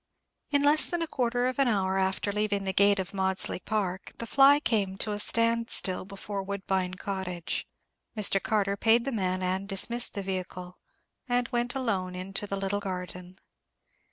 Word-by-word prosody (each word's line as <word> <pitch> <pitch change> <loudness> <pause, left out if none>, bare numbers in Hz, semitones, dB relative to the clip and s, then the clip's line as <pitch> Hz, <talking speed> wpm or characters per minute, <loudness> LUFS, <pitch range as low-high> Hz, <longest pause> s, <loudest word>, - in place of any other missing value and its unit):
In 285 -1 +2
less 295 +2 +5
than 345 -1 -2
a - - -3
quarter 245 -3 0
of 255 +2 -2
an 275 - +4
hour 195 -4 +1
after 190 +1 0
leaving 205 -1 0
the 190 -1 -1
gate 200 +1 +4
of 190 0 -4
Maudesley 190 -1 0
Park, 190 -3 -3
the 235 - -5
fly 275 +4 +6
came 200 -9 0
to 210 - -3
a 205 - -2
stand 230 +1 +1
still 185 -1 +1
before 200 +1 -6
Woodbine 190 -2 -2
Cottage. 185 -3 -4 0.5
Mr. 195 -2 +3
Carter 200 -2 0
paid 230 +3 +3
the 275 - -1
man 185 -4 -1
and 190 +2 -1
dismissed 235 +6 +2
the 200 - -3
vehicle, 185 -1 -5 0.5
and 245 0 +1
went 245 0 -1
alone 195 -8 -1
into 195 +3 -4
the 200 - -3
little 195 +1 -1
garden. 180 -2 -6
200 Hz, 175 wpm, -28 LUFS, 190-230 Hz, 0.5 s, fly